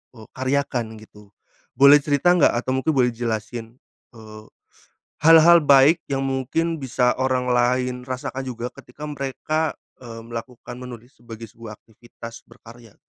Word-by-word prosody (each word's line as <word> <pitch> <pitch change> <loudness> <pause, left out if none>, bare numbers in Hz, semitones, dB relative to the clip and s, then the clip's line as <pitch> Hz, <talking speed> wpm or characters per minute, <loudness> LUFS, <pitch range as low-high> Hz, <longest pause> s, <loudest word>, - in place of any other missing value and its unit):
e - - -15
karyakan 130 -2 -1 0.2
gitu, 105 -1 -18 0.5
boleh 140 +2 +7
cerita 145 +4 +2
nggak? 175 -4 +3
Atau 125 +2 -3
mungkin 155 +4 0
boleh 125 -2 +2
jelasin, 115 0 -5 0.4
eee, 110 -1 -12 0.8
hal-hal 165 +1 +8
baik 140 +4 +5
yang 135 -1 -2
mungkin 135 +5 -2
bisa 125 -2 0
orang 130 -1 0
lain 125 +1 0
rasakan 130 +1 -5
juga 125 -1 -5
ketika 125 +4 -15
mereka, 150 +2 -3 0.3
eee, 115 -2 -10
melakukan 120 +1 -9
menulis 125 0 -11
sebagai 115 -2 -11
sebuah 115 -1 -11
aktivitas 115 +1 -14
berkarya. 115 -2 -17
125 Hz, 135 wpm, -22 LUFS, 115-140 Hz, 0.8 s, hal-hal